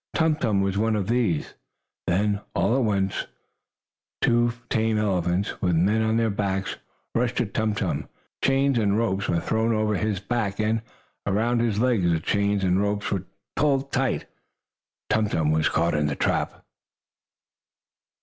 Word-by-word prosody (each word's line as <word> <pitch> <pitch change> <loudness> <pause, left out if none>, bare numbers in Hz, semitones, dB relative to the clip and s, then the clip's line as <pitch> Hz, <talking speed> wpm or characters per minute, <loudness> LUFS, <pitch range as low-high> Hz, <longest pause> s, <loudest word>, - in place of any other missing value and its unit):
Tum 160 -2 +3
Tum 110 -9 +1
was 100 0 0
one 110 0 +2
of 100 -3 -1
these. 115 -9 0 0.5
Then, 100 +3 +1
all 120 - +2
at 135 - +2
once 100 -3 0 0.9
two 120 0 +3
tame 110 -1 +1
elephants, 95 -2 0
with 90 -3 +2
men 100 +7 +3
on 110 0 +1
their 115 -1 +2
backs, 95 -1 -2 0.4
rushed 120 +1 0
at 105 - -2
Tum 110 -1 0
Tum. 80 -9 -2 0.3
Chains 135 -1 +3
and 100 -1 +2
ropes 100 -4 0
were 85 - +2
thrown 110 +5 0
over 110 0 +1
his 105 -1 -1
back, 100 -1 -2
and 110 +1 +1 0.5
around 115 +5 +1
his 115 -3 +1
legs. 115 -8 +2
The 80 - +2
chains 100 +3 0
and 95 +1 +2
ropes 105 0 -1
were 95 -2 -1 0.3
pulled 140 -2 +1
tight. 130 -1 0 0.9
Tum 110 -1 +2
Tum 80 -4 +1
was 80 0 +2
caught 85 +1 +1
in 75 -1 +1
the 70 - -2
trap. - - -1
105 Hz, 160 wpm, -25 LUFS, 95-115 Hz, 0.9 s, Tum